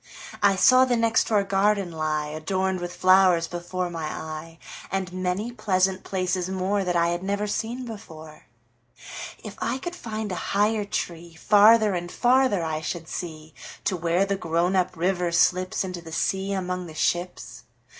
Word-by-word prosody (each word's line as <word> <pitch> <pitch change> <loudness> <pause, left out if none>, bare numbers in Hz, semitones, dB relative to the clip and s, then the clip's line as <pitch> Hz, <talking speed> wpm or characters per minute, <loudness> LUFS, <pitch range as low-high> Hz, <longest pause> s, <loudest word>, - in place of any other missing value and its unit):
I 200 -1 +4
saw 255 +7 +6
the 250 -2 +2
next 230 -1 +2
door 210 -3 +2
garden 195 -1 +1
lie, 155 -1 -1
Adorned 185 +5 -1
with 175 0 -6
flowers, 185 -2 +4
before 175 +1 -4
my 165 -2 -4
eye, 160 +1 -6 0.3
And 190 -1 -2
many 185 +5 -2
pleasant 190 -4 0
places 185 -1 -1
moreThat 190 -1 -1
I 170 0 +3
had 175 0 -2
never 200 +2 -1
seen 235 +4 -3
before. 160 -9 -11 1.0
If - - -8
I - - -1
could 350 +6 -6
find 220 - -5
a 185 +2 -3
higher 210 0 +2
treeFarther 205 +5 +3
and 175 0 -4
farther 250 -6 +3
I 155 -1 -2
should 165 0 -5
see, 155 -3 -7 0.3
To 190 - 0
where 170 +2 +1
the 200 0 -1
grown 175 +1 0
up 185 -1 0
river 180 0 0
slipsInto 180 +1 +1
the 165 - -10
sea 190 +4 -1
among 180 -2 -3
the 160 - -11
ships. 155 -7 -2
185 Hz, 155 wpm, -25 LUFS, 170-200 Hz, 1.0 s, saw